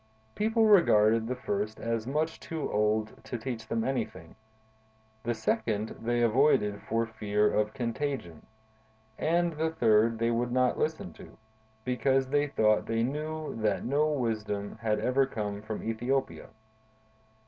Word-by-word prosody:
People 220 +1 +2
regarded 115 - +5
the 125 - -2
first 105 -3 -3
as 115 0 -2
much 155 +4 -1
too 160 -2 -4
old 105 +1 0
to 120 - -5
teach 115 -2 -5
them 115 0 -1
anything; 110 -10 -3 0.9
the 120 0 -2
second 110 -1 -1
they 120 +1 +1
avoided 115 -4 +3
for 115 +1 +1
fear 105 -1 0
of 105 0 0
contagion; 125 - -3 0.8
and 170 +1 +1
the 160 +1 0
third 115 -6 +3
they 115 +1 +1
would 120 +1 0
not 125 0 +2
listen 160 +5 -2
to, - - -14 0.5
because 130 +2 +1
they 145 +1 +2
thought 110 -6 +2
they 115 0 0
knew 155 +4 -3
that 105 -4 0
no 145 +5 +2
wisdom 110 -7 -2
had 105 -1 0
ever 130 +4 +2
come 105 -4 -4
from 110 0 -5
Ethiopia. 120 +5 -2
115 Hz, 140 wpm, -29 LUFS, 110-135 Hz, 0.9 s, regarded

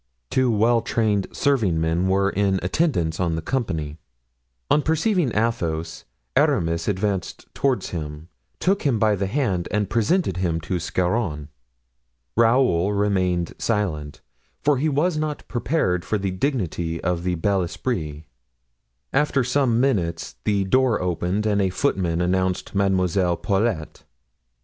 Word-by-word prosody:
Two 130 -1 +2
well 115 +2 +3
trained 110 -4 0
servingmen 90 - +1
were 100 +1 +2
in 100 -2 +1
attendance 90 - 0
on 85 -3 0
the 80 - -3
company. 80 - -2 0.7
On 150 - +5
perceiving 160 - +1
Athos, 85 -8 -1 0.3
Aramis 85 0 +2
advanced 100 -3 -2
toward 130 -8 +1
him, 75 -1 -6 0.3
took 195 +2 +1
him 135 -6 +1
by 110 -1 +3
the 100 0 -2
hand 100 -8 -1
and 105 -1 -1
presented 115 - +1
him 85 -3 0
to 90 +2 -2
Scarron. 90 -4 -1 0.9
Raoul 115 -5 +3
remained 95 -4 0
silent, 85 -10 -2 0.4
for 145 -2 +3
he 155 +3 +1
was 155 +4 +1
not 155 -1 -3
prepared 120 - 0
for 110 - -1
the 95 -1 -2
dignity 90 - -2
of 90 0 0
the 90 0 -1
bel 95 +3 +1
esprit. 80 - -3 0.9
After 140 -1 +2
some 125 -2 +2
minutes 90 - 0
the 100 -2 +2
door 125 +3 +2
opened 90 +3 -1
and 105 -2 +2
a 95 - +2
footman 90 -2 0
announced 95 +1 0
Mademoiselle 95 -2 +1
Paulet. 100 -5 -1
100 Hz, 130 wpm, -23 LUFS, 85-120 Hz, 0.9 s, On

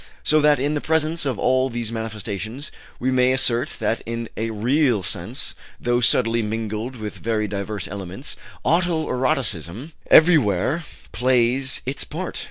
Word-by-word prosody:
So 155 0 +4
that 150 -1 +4
in 145 +3 0
the 150 - -1
presence 160 0 +1
of 130 -5 -1
all 130 +4 +2
these 120 -2 -3
manifestations 110 +3 -5 0.3
we 130 +2 0
may 130 0 +4
assert 125 -2 +1
that 110 +1 -1
in 115 0 -4
a 115 +1 -2
real 120 0 +2
sense, - - -3 0.3
though 120 0 +1
subtly 115 -1 +3
mingled 110 +3 -3
with 110 -3 -6
very 110 -2 -1
diverse 100 -1 -4
elements, 100 - -6 0.3
auto 170 -1 +2
erotism 125 - -2 0.2
everywhere 155 - +5 0.3
plays 125 +2 +2
its 130 +1 -2
part. 175 +4 -5
120 Hz, 145 wpm, -22 LUFS, 110-140 Hz, 0.3 s, everywhere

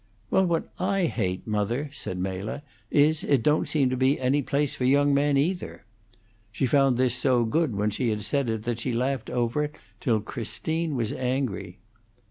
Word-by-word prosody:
"Well, 190 -1 +4
what 165 -2 0
I 190 0 +1
hate, 95 - -2
mother," 115 +7 -1
said 95 -9 -5
Mela, 95 +9 -4 0.3
"is, 150 +1 +3
it 135 -5 +2
don't 150 +1 +2
seem 135 -5 +1
to - - 0
be 130 +2 +2
any 130 +3 +2
place 140 +1 0
for - - -4
young 140 +2 +4
men, 140 0 +3
either." 170 - -2 0.7
She 115 +5 -1
found 135 -1 +3
this 125 -1 +2
so 125 -2 +2
good 150 0 0
when 105 +1 0
she 120 +3 -1
had 105 -1 -2
said 140 -1 0
it 110 -1 -2
that 120 0 -2
she 125 +1 -2
laughed 130 +1 -1
over 125 +4 0
it 150 - -8 0.2
till 115 -6 +1
Christine 155 +8 -3
was 115 -4 -1
angry. 125 -8 -2
130 Hz, 185 wpm, -26 LUFS, 115-145 Hz, 0.7 s, Well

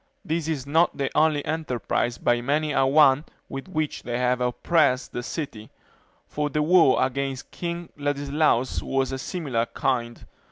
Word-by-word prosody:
This 160 0 -1
is 150 -5 -2
not 160 +4 +2
the 140 -2 -1
only 155 -2 +3
enterprise 125 -6 -2
by 120 0 +1
many 150 +4 0
a 135 -1 +2
one 140 0 +5 0.2
with 135 +4 -7
which 155 -5 -2
they 120 0 -3
have 125 0 +1
oppressed 130 +2 +1
the 120 - -4
city; 120 -5 -6 0.6
for 150 0 -2
the 150 +1 0
war 165 -4 +5
against 135 0 -4
King 170 -1 -5
Ladislaus 145 -2 0
was 135 -1 -1
of 135 - -3
a - - -9
similar 130 -9 -2
kind. 120 -3 -2
140 Hz, 160 wpm, -25 LUFS, 125-155 Hz, 0.6 s, one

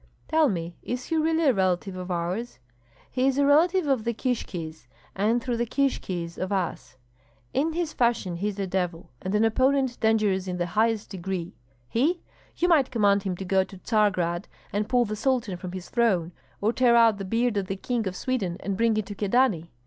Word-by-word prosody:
"Tell 315 -2 +4
me, 170 -3 -3
is 250 +1 -4
he 325 - -2
really 320 +1 +2
a 275 -4 +5
relative 185 -1 0
of 185 0 -6
ours?" 180 - -3 0.5
"He 255 +1 +1
is 270 0 +1
a 285 - +4
relative 330 +5 +4
of 270 -6 +1
the 235 0 -1
Kishkis, 170 - -4 0.3
and 225 +5 +1
through 245 -2 -1
the 235 - 0
Kishkis 185 -11 -2
of 185 +2 -3
us." 180 -8 -3 0.6
"In 310 +4 +1
his 335 -2 -2
fashion 235 -8 +1
he 200 +4 -1
is 205 -1 -4
a 200 - -1
devil, 180 -2 -3
and 190 +2 -2
an 215 +2 +4
opponent 260 +2 +2
dangerous 210 -4 +2
in 180 -1 -3
the 175 - 0
highest 215 +4 0
degree." 185 -1 -4 0.3
"He? 295 - 0 0.3
You 355 - +2
might 305 -7 +4
command 205 -4 +3
him 190 -2 -2
to 190 - -5
go 190 0 +3
to 190 - -12
Tsargrad 185 -4 +1 0.3
and 205 +1 -1
pull 245 -1 +3
the 215 0 -3
Sultan 235 -4 0
from 180 0 -7
his 185 -1 -7
throne, 195 -8 +1 0.3
or 215 +3 +2
tear 245 -2 +4
out 230 -3 +5
the - - -3
beard 230 +4 0
of 200 -2 -1
the 195 - -2
King 230 +1 -2
of 185 - -4
Sweden 195 -8 -2
and 200 0 -2
bring 230 +1 +2
it 215 - -1
to 205 - -7
Kyedani. 205 -5 +1
210 Hz, 205 wpm, -26 LUFS, 185-250 Hz, 0.6 s, a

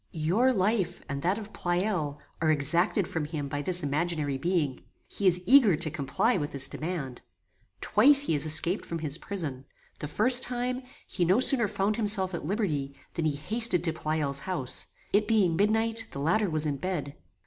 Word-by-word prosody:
Your 185 +11 +1
life, 200 -2 -1
and 140 0 -5
that 185 +5 0
of 215 -1 -9
Pleyel, 175 -5 -2 0.2
are 160 - +1
exacted 170 +6 +1
from 160 -3 -4
him 150 -2 -5
by 145 +1 -4
this 180 +2 -2
imaginary 150 0 -2
being. 155 -5 -1 0.3
He 200 - -2
is 180 0 +4
eager 240 - +5
to 155 0 0
comply 170 - -1
with 145 -3 -5
this 135 -1 +2
demand. 150 -7 -6 0.6
Twice 270 +7 +5
he 285 - -1
has 150 +1 +2
escaped 165 +5 +4
from 170 - -6
his 155 -1 -3
prison. 155 -10 -5 0.4
The 150 - -5
first 245 - +5
time, 250 +1 -2 0.2
he 185 - -3
no 185 +7 +2
sooner 255 -4 +5
found 200 +2 -2
himself 205 -4 +1
at 170 - -5
liberty, 150 -8 -3 0.2
than 165 - -3
he 150 -2 0
hasted 185 +3 +3
to 165 -2 0
Pleyel's 155 -3 -2
house. 135 -7 -1 0.3
It 210 +1 +2
being 205 -7 +2
midnight, 225 +3 +1
the 140 - -8
latter 175 +8 0
was 155 -1 +2
in 145 -2 -2
bed. 150 -3 -4
175 Hz, 180 wpm, -27 LUFS, 150-210 Hz, 0.6 s, eager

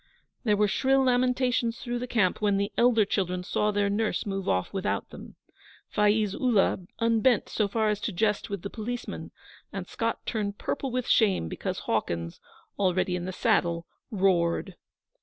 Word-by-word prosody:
There 210 -2 +3
were 210 0 +3
shrill 265 +6 +2
lamentations 250 -2 +1
through 240 -1 -3
the 250 - -4
camp 215 -5 +1
when 205 -2 +2
the 200 +1 -1
elder 235 -3 +4
children 180 -2 -1
saw 210 +2 0
their 205 -1 +1
nurse 210 +2 0
move 195 -2 -3
off 90 0 0
without 195 -1 -2
them. - - -11 0.6
Faiz 210 -1 +3
Ullah 225 -6 +2 0.2
unbent 230 0 +2
so 210 - 0
far 220 +2 0
as 210 -1 -1
to - - -2
jest 210 +2 0
with 200 -3 -4
the 200 - -4
policemen, 240 +2 -5 0.4
and - - -5
Scott - - -3
turned 205 -3 -2
purple 275 - -3
with 250 0 -2
shame 195 - +3
because - - -4
Hawkins, 85 0 -2 0.4
already 185 -1 +1
in 175 -1 -3
the 185 - -3
saddle, 175 -5 +1 0.2
roared. 185 -2 +1
210 Hz, 165 wpm, -27 LUFS, 190-230 Hz, 0.6 s, elder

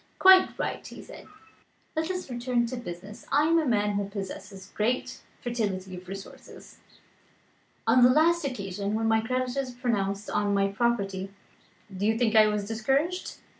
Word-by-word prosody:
"Quite 375 0 +6
right," - - -3
he - - -10
said; - - -12 0.7
"let 320 +2 -1
us 365 -1 -3
return 245 -1 0
to 245 +2 -4
business. 205 -3 -8
I 290 +2 +4
am 330 +2 +4
a 310 - -1
man 210 -3 +2
who 200 -1 -2
possesses 195 -1 -7
great 235 +4 -1 0.2
fertility 200 -6 -2
of 180 0 -11
resource. 195 +1 -11 1.1
On 255 - +5
the 245 - +8
last 330 +5 +4
occasion 200 -5 -3
when 225 0 0
my 225 0 +3
creditors 255 +2 -2
pounced 205 -5 -1
on 205 -1 0
my 195 0 +2
property, 195 -3 -1 0.6
do 200 +3 0
you 225 0 +2
think 225 -2 +1
I 215 -1 +7
was 210 -1 -1
discouraged? 275 - -1
225 Hz, 160 wpm, -27 LUFS, 200-255 Hz, 1.1 s, the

